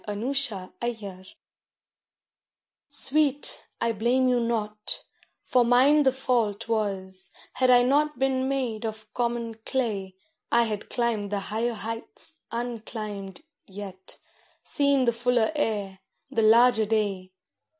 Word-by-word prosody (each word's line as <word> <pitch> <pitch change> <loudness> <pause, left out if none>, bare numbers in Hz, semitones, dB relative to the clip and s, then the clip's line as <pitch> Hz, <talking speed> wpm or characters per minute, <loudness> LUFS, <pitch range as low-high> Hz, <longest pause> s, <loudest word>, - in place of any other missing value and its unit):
FLOWER 215 +6 -2 0.5
OF 240 -1 -2
LOVE 190 -1 -8 1.6
SWEET, 290 0 +2
I 230 - +1
blame 240 +4 +2
you 250 -1 +3
not, 215 -3 -2 0.4
for 250 - +3
mine 260 +5 +5
the 265 -2 +4
fault 235 -5 0
was, 190 -4 -2 0.2
had 255 0 +2
I 245 -1 +7
not 295 +4 +2
been 265 0 +1
made 250 -5 -2
of 215 -1 -6
common 235 -2 -2
clay 205 -8 -2 0.4
I 235 0 +5
had 215 -3 -4
climbed 230 -4 -1
the 205 - 0
higher 225 +4 -2
heights 230 +8 -5
unclimbed 220 -3 -5 0.2
yet, 190 -1 -9 0.5
seen 280 -2 +2
the 235 - +3
fuller 240 0 +2
air, 205 -9 -2 0.3
the 225 - +1
larger 225 0 +5
day. 200 -4 -1
230 Hz, 120 wpm, -26 LUFS, 210-250 Hz, 1.6 s, I